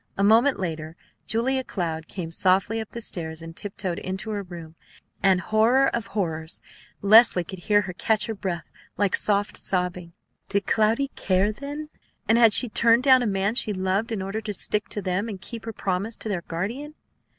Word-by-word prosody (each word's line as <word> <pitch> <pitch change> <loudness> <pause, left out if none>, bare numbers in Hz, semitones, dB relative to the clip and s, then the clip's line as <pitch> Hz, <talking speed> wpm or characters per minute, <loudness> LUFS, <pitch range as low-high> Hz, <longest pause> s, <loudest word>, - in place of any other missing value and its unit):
A 195 - +1
moment 230 +7 +4
later 160 -3 -4 0.3
Julia 260 +4 0
Cloud 165 -7 -4
came 170 -4 -6
softly 190 +6 +1
up 220 - -8
the 235 - -7
stairs 160 -4 -3
and 165 0 -9
tiptoed 190 -3 -4
into 190 +4 -4
her 210 - -2
own 195 - -8
room, 165 -2 -9 0.5
and, 190 -2 +4
horror 225 +8 +3
of 230 -4 -3
horrors! 160 -6 -3 0.4
Leslie 215 -3 +7
could 190 +2 -9
hear 205 +3 +3
her 190 -3 -6
catch 215 +4 +1
her 225 - -3
breath 185 -5 -4 0.3
like 200 -2 +2
soft 205 0 0
sobbing! 180 -2 -2 0.4
Did 200 -1 0
Cloudy 225 +6 +2
care, 190 +2 +1
then, 290 +6 -7 0.4
and 225 +2 +4
had 230 -2 +7
she 245 - +7
turned 230 +2 +3
down 260 -2 +6
a 240 - 0
man 195 +1 0
she 220 -3 0
loved 190 +4 -1
in 205 -4 -2
order 200 +3 -4
to 215 -1 -4
stick 210 +2 -1
to 205 - -4
them 190 +4 -1
and 200 -3 -6
keep 230 +3 -8
her 225 - -4
promise 200 +2 -2
to 220 - -6
their 190 -4 -2
guardian? 235 - -5
205 Hz, 195 wpm, -24 LUFS, 180-225 Hz, 0.5 s, Leslie